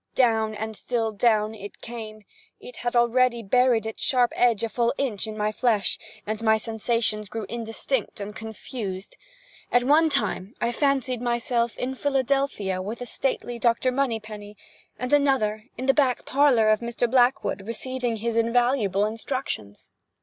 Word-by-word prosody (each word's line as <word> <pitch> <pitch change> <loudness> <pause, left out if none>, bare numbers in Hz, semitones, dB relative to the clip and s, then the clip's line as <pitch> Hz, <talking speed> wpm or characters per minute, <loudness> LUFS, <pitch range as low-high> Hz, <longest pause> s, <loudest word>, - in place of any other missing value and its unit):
Down 220 -3 +2
and 220 +1 -5
still 225 0 -1
down, 215 0 +2
it 205 -2 -10
came. 215 -3 -8 0.3
It - - -11
had 240 0 -3
already 240 0 +3
buried 240 +1 +3
its 220 - -6
sharp 245 -2 +2
edge 235 -4 +3
a 230 - 0
full 235 +3 0
inch 220 -8 -1
in 215 0 -6
my 210 0 0
flesh, 215 -2 +1 0.3
and 215 +1 -3
my 220 -1 +4
sensations 220 -1 -1
grew 220 0 -4
indistinct 230 0 -3
and 205 +1 -6
confused. 220 -3 -6 0.6
At 245 - +4
one 310 +5 +4
time 240 -7 -1
I 235 - 0
fancied 265 -2 0
myself 235 -1 0
in 255 +1 -2
Philadelphia 270 -8 0
with 210 +5 -5
the 245 - -6
stately 245 -1 -2
Dr. 235 +2 +2
Moneypenny, 215 -6 -3 0.4
at 250 +2 -3
another 255 -7 +2
in 260 - -4
the 270 - +5
back 265 -4 +1
parlor 265 -6 +4
of 215 -1 +4
Mr. 235 0 -1
Blackwood 245 -3 +2
receiving 245 0 -2
his 225 +1 -2
invaluable 230 -3 +2
instructions. 215 - -4
235 Hz, 155 wpm, -25 LUFS, 215-255 Hz, 0.6 s, the